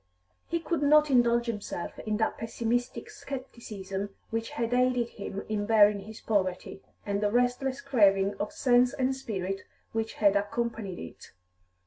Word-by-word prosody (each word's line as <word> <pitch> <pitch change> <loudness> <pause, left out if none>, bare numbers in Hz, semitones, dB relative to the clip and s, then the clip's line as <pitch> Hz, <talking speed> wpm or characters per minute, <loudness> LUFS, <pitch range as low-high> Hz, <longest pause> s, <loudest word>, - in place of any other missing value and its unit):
He 335 - -1
could 330 -2 -2
not 300 0 +5
indulge 240 -2 +4
himself 210 -6 -5
in 215 -1 -2
that 220 - 0
pessimistic 230 +2 -2
scepticism 210 -7 -6 0.2
which 225 0 -2
had 230 +1 -2
aided 250 -1 +2
him 200 -2 -6
in 205 -1 -2
bearing 210 -2 +5
his 220 +1 -10
poverty, 190 -3 -1 0.2
and 200 0 -1
the 210 - +2
restless 250 +4 +1
craving 200 -7 +3
of 210 - -2
sense 245 0 +3
and 265 0 0
spirit 195 -7 -4 0.3
which 225 0 -2
had 205 -2 +3
accompanied 205 -1 -2
it. 85 - -10
225 Hz, 145 wpm, -29 LUFS, 205-245 Hz, 0.3 s, not